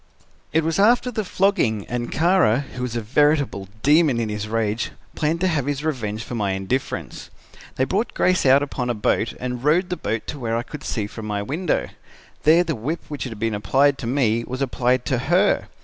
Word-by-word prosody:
"It 160 Hz, +1 st, +2 dB
was 165 Hz, +3 st, 0 dB
after 240 Hz, +4 st, +4 dB
the 215 Hz, -2 st, -2 dB
flogging, 180 Hz, -, +1 dB
and 120 Hz, 0 st, -4 dB
Kara, 165 Hz, -, +3 dB
who 125 Hz, -, -6 dB
was 125 Hz, -2 st, -3 dB
a 115 Hz, -, -1 dB
veritable 140 Hz, -3 st, +1 dB, 0.2 s
demon 150 Hz, -4 st, +4 dB
in 115 Hz, -2 st, -1 dB
his 105 Hz, 0 st, -4 dB
rage, 110 Hz, 0 st, -1 dB, 0.2 s
planned 160 Hz, +2 st, -1 dB
to 185 Hz, -, +3 dB
have 150 Hz, -6 st, 0 dB
his 145 Hz, 0 st, -2 dB
revenge 115 Hz, -8 st, -2 dB
for 120 Hz, -, -8 dB
my 100 Hz, -4 st, 0 dB
indifference. 95 Hz, +8 st, -3 dB, 0.5 s
They 130 Hz, -, +1 dB
brought 195 Hz, -, -1 dB
Grace 185 Hz, 0 st, +2 dB
out 135 Hz, +1 st, +5 dB
upon 125 Hz, -3 st, -3 dB
a 120 Hz, -, 0 dB
boat 110 Hz, +1 st, 0 dB
and 125 Hz, 0 st, -4 dB
rowed 175 Hz, +5 st, +2 dB
the 180 Hz, -, -1 dB
boat 110 Hz, +1 st, -3 dB
to 145 Hz, -, -6 dB
where 115 Hz, -2 st, -1 dB
I 120 Hz, -, -2 dB
could 150 Hz, +4 st, -9 dB
see 110 Hz, -, -2 dB
it 105 Hz, -, -7 dB
from 110 Hz, -2 st, -7 dB
my 100 Hz, -1 st, -2 dB
window. 160 Hz, -, -1 dB, 0.6 s
There 165 Hz, +3 st, +6 dB
the 170 Hz, -2 st, -2 dB
whip 140 Hz, +8 st, -3 dB
which 145 Hz, -3 st, -4 dB
had 115 Hz, -4 st, -6 dB
been 110 Hz, +1 st, -1 dB
applied 135 Hz, +7 st, +2 dB
to 120 Hz, -, -4 dB
me 115 Hz, -3 st, +1 dB
was 130 Hz, +3 st, -3 dB
applied 125 Hz, -1 st, 0 dB
to 130 Hz, -, 0 dB
her. 175 Hz, +9 st, +2 dB
130 Hz, 210 wpm, -22 LUFS, 115-155 Hz, 0.6 s, There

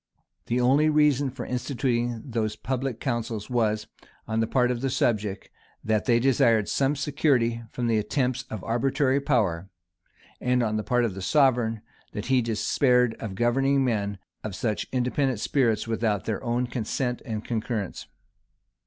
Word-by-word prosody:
The 120 Hz, +1 st, +1 dB
only 135 Hz, +5 st, +4 dB
reason 150 Hz, -3 st, +3 dB
for 130 Hz, -, -7 dB
instituting 120 Hz, -2 st, -1 dB
those 110 Hz, -4 st, -2 dB
public 130 Hz, 0 st, -3 dB
councils 115 Hz, -3 st, -3 dB
was, 110 Hz, -3 st, +1 dB, 0.4 s
on 110 Hz, 0 st, -1 dB
the 115 Hz, -, +1 dB
part 125 Hz, 0 st, +2 dB
of 120 Hz, -1 st, -3 dB
the 135 Hz, -, 0 dB
subject, 105 Hz, -5 st, -1 dB, 0.3 s
that 110 Hz, -1 st, 0 dB
they 120 Hz, -2 st, +4 dB
desired 120 Hz, -5 st, +3 dB
some 140 Hz, +1 st, +1 dB
security 135 Hz, -5 st, +1 dB
from 120 Hz, -, -3 dB
the 115 Hz, -2 st, +2 dB
attempts 125 Hz, +4 st, -1 dB
of 110 Hz, -4 st, -6 dB
arbitrary 135 Hz, +4 st, +1 dB
power; 100 Hz, -, 0 dB, 0.7 s
and 125 Hz, 0 st, +1 dB
on 110 Hz, -2 st, 0 dB
the 110 Hz, -, -1 dB
part 125 Hz, 0 st, +2 dB
of 110 Hz, -, -2 dB
the 95 Hz, -, -7 dB
sovereign, 115 Hz, 0 st, +2 dB, 0.3 s
that 105 Hz, -, -4 dB
he 130 Hz, -, +5 dB
despaired 125 Hz, +2 st, +2 dB
of 105 Hz, -4 st, -5 dB
governing 135 Hz, +5 st, +2 dB
men 100 Hz, -4 st, -1 dB, 0.3 s
of 105 Hz, -3 st, -5 dB
such 110 Hz, -1 st, -2 dB
independent 130 Hz, -1 st, 0 dB
spirits 115 Hz, -3 st, +1 dB
without 110 Hz, -3 st, 0 dB
their 110 Hz, +2 st, -3 dB
own 120 Hz, +1 st, 0 dB
consent 120 Hz, +1 st, -2 dB
and 110 Hz, -2 st, -5 dB
concurrence. 110 Hz, -4 st, -3 dB
120 Hz, 155 wpm, -26 LUFS, 110-130 Hz, 0.7 s, he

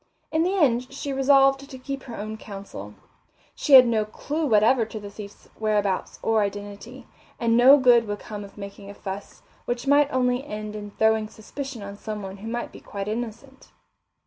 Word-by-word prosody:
In 315 Hz, -, +2 dB
the 365 Hz, +4 st, +1 dB
end 255 Hz, -6 st, +2 dB
she 275 Hz, 0 st, -4 dB
resolved 270 Hz, 0 st, +4 dB
to 260 Hz, -, -8 dB
keep 275 Hz, +1 st, -5 dB
her 240 Hz, -4 st, -9 dB
own 215 Hz, +1 st, -5 dB
counsel. 200 Hz, -2 st, -9 dB, 0.6 s
She 290 Hz, -, -1 dB
had 255 Hz, -1 st, +11 dB
no 225 Hz, -2 st, +2 dB
clue 295 Hz, +8 st, -3 dB
whatever 225 Hz, +2 st, +4 dB
to 220 Hz, 0 st, -6 dB
the 205 Hz, -1 st, -9 dB
thief's 200 Hz, -1 st, -11 dB
whereabouts 210 Hz, -3 st, 0 dB
or 225 Hz, -1 st, +3 dB
identity, 205 Hz, +5 st, -5 dB, 0.3 s
and 230 Hz, -1 st, +2 dB
no 260 Hz, +4 st, +8 dB
good 245 Hz, -4 st, +5 dB
would 205 Hz, 0 st, -3 dB
come 205 Hz, 0 st, -7 dB
of 200 Hz, +1 st, -13 dB
making 200 Hz, 0 st, -9 dB
a 200 Hz, -, -9 dB
fuss, 195 Hz, +1 st, -8 dB, 0.2 s
which 240 Hz, +1 st, -3 dB
might 285 Hz, +1 st, +4 dB
only 250 Hz, 0 st, +1 dB
end 215 Hz, -4 st, -6 dB
in 205 Hz, -1 st, -6 dB
throwing 220 Hz, +1 st, +2 dB
suspicion 245 Hz, +2 st, -8 dB
on 200 Hz, 0 st, -8 dB
someone 205 Hz, -3 st, -6 dB
who 210 Hz, +3 st, -9 dB
might 240 Hz, +1 st, -4 dB
be -, -, -12 dB
quite 200 Hz, 0 st, -6 dB
innocent. 235 Hz, +4 st, -6 dB
225 Hz, 185 wpm, -25 LUFS, 205-265 Hz, 0.6 s, had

